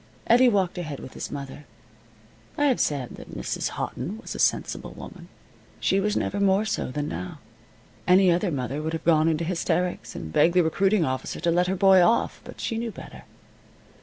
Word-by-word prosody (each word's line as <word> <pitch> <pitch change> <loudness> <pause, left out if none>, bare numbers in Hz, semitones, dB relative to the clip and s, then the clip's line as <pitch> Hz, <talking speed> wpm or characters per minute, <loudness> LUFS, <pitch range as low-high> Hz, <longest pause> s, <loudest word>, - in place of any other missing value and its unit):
Eddie 245 +2 +6
walked 190 -5 0
ahead 150 -5 -5
with - - -10
his - - -6
mother. 140 +1 -7 0.9
I 290 - +2
have 265 -4 +2
said 140 -5 -1
that - - -10
Mrs. - - -2
Houghton 170 - -4
was 230 - -8
a - - -7
sensible - - 0
woman. - - -11 0.5
She 195 - +2
was 210 +1 0
never 200 - -1
more 200 +1 +3
so 215 - -2
than 145 +3 -3
now. 90 - -6 0.7
Any 185 0 +6
other 180 +3 +1
mother 140 -1 -3
would 160 +1 -3
have 160 - -4
gone 160 -1 +4
into 165 0 +1
hysterics 170 -7 -2
and 80 -1 -7
begged 170 +2 +4
the 180 - +5
recruiting 195 +3 +2
officer 130 0 -3
to 170 - +2
let 180 +1 +2
her 190 - 0
boy 190 -1 +6
off. 225 +7 +2
But - - -12
she 225 -2 -2
knew 235 0 -3
better. - - -11
175 Hz, 190 wpm, -25 LUFS, 150-195 Hz, 0.9 s, Eddie